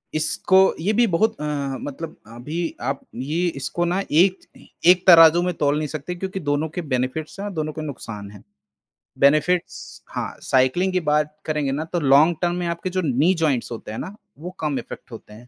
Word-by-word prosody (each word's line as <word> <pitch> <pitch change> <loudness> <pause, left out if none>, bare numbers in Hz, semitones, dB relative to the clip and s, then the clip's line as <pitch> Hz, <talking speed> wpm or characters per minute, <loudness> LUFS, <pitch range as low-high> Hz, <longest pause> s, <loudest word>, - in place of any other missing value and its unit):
इसको 155 +4 +2 0.2
ये 195 +7 0
भी 235 +3 +4
बहुत 220 +5 +1
अ, - - -3 0.4
मतलब 155 +3 -7
अभी 120 +8 -7 0.2
आप 135 +3 -2 0.2
ये 155 +8 -1
इसको 175 +6 -2
ना 180 +3 0
एक 185 +5 +4 0.5
एक 180 0 +6
तराजू 165 -1 +8
में 180 0 -1
तोल 145 -2 +1
नहीं 150 0 -2
सकते 155 +4 -5
क्योंकि 190 +2 -5
दोनों 145 -1 -1
के 180 - -2
बेनिफिट्स 140 +4 -3
हैं 200 - -4
और 200 - -6
दोनों 155 -2 -3
के 155 - -6
नुकसान 115 -9 -7
हैं। 105 - -14 0.8
बेनिफिट्स 155 +6 +1
हाँ, - - -5
साइक्लिंग 135 +9 +2
की 185 - +2
बात 150 0 +1
करेंगे 150 -3 -1
ना 150 +3 -2
तो 175 - +1
लॉन्ग 150 +4 +5
टर्म 175 -1 +1
में 175 -1 -2
आपके 170 +2 -3
जो 185 0 -1
नी 145 +6 +3
जॉइंट्स 135 -6 0
होते 110 -2 -7
हैं 110 - -5
ना, 195 - -7 0.2
वो 175 +4 -7
कम 150 -3 -1
इफ़ेक्ट - - -10
होते 110 -2 -11
हैं, 120 +3 -14
155 Hz, 200 wpm, -22 LUFS, 140-180 Hz, 0.8 s, तराजू